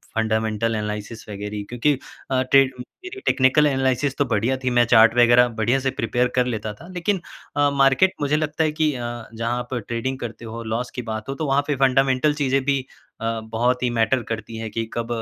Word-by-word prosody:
Fundamental 110 0 0
analysis 105 +1 -5
वगैरह 105 0 -5
क्योंकि 120 +5 +1 0.4
अ, 130 -1 +2
टे 135 0 +8
अ, - - -5 0.4
मेरी 370 +2 -7
टेक्निकल 135 +3 +4
एनालिसिस 135 0 0
तो 140 - +2
बढ़िया 115 +2 0
थी। 130 - +1
मैं 120 - +6
चार्ट 115 +1 +7
वगैरह 120 0 +6
बढ़िया 120 +5 +2
से 135 0 0
प्रिपेयर 120 +2 +1
कर 125 -1 +3
लेता 110 -3 -3
था। 165 - -14
लेकिन 180 +2 0 0.4
अ, 145 0 +4
मार्केट 135 +6 +4
मुझे 145 +1 +1
लगता 155 +1 -1
है 155 - +1
कि 155 -1 +1
अ, 120 -1 -5
जहाँ 115 +2 -2
पर 125 - -1
ट्रेडिंग 120 +5 -3
करते 115 -1 -7
हो 115 +1 -6
लॉस 115 +2 -3
की 125 - -3
बात 110 +2 -5
हो 135 - -2
तो 155 - -3
वहाँ 135 +1 +3
पे 145 - +1
फंडामेंटल 135 +2 +3
चीज़ें 135 -2 +1
भी 140 0 +2 0.4
अ, 115 0 -1
बहुत 120 +3 0
ही 125 - +2
मैटर 115 +3 +2
करती 115 0 -5
है 110 0 -5
कि 115 +2 -3
कब 115 -1 -3
125 Hz, 210 wpm, -22 LUFS, 115-135 Hz, 0.4 s, टे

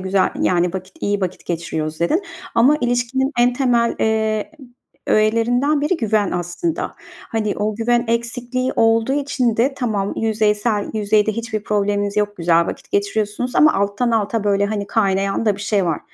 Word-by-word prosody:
güzel 190 +1 +1
yani, 175 -1 +2
vakit 190 0 -7
iyi 205 0 0
vakit 185 -1 -4
geçiriyoruz 160 -2 -3
dedin. 315 - +1 0.3
Ama 255 +6 +5
ilişkinin 245 +3 0
en 245 +1 +4
temel, 245 -2 +1
eee, 220 -1 0 0.6
öğelerinden 240 +7 +2
biri 310 +4 +1
güven 215 -4 0
aslında. 175 - -3 0.3
Hani, 215 -2 -1
o 210 0 -1
güven 240 +2 +1
eksikliği 240 +2 -1
olduğu 225 +3 +3
için 270 -5 0
de 265 +4 +2
tamam, 210 -6 -2
yüzeysel 210 -1 0
yüzeyde 215 0 +2
hiçbir 220 -1 -4
probleminiz 205 -1 0
yok, 205 0 0
güzel 170 0 +2
vakit - - -7
geçiriyorsunuz 210 +4 -1
ama 305 0 +6
alttan 200 +5 0
alta 220 -1 0
böyle, 200 0 +2
hani, 205 -1 -3
kaynayan 195 0 0
da 205 -2 +2
bir - - -10
şey 200 -2 +1
var, 165 -3 -1
215 Hz, 155 wpm, -20 LUFS, 200-240 Hz, 0.6 s, ama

